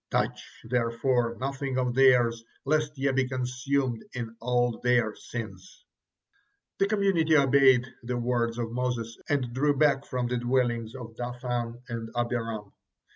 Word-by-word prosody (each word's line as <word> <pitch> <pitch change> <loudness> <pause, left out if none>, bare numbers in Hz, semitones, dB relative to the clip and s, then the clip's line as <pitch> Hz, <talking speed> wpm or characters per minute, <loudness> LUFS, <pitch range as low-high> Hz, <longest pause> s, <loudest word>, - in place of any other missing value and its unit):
'Touch, - - 0 0.2
therefore, 115 0 0
nothing 135 0 -3
of 125 -1 0
theirs, 120 -3 +4 0.2
lest 150 0 0
ye 135 0 +1
be 130 -1 +1
consumed 130 -1 -1
in 115 -2 -5
all 120 0 +1
their 120 -3 +2
sins.'" 100 -7 -8 0.9
The 195 - +3
community 195 -7 +3
obeyed 135 -3 +5 0.2
the 125 +1 -3
words 120 -1 0
of 115 -1 -3
Moses 120 -2 -2
and 130 -5 0
drew 145 +2 +2
back 140 -1 +3
from 125 -2 -2
the 125 +1 -1
dwellings 120 -1 0
of 120 -3 -9
Dathan 120 -1 -4
and 115 -1 -5
Abiram. 115 -3 -2
125 Hz, 135 wpm, -28 LUFS, 115-135 Hz, 0.9 s, obeyed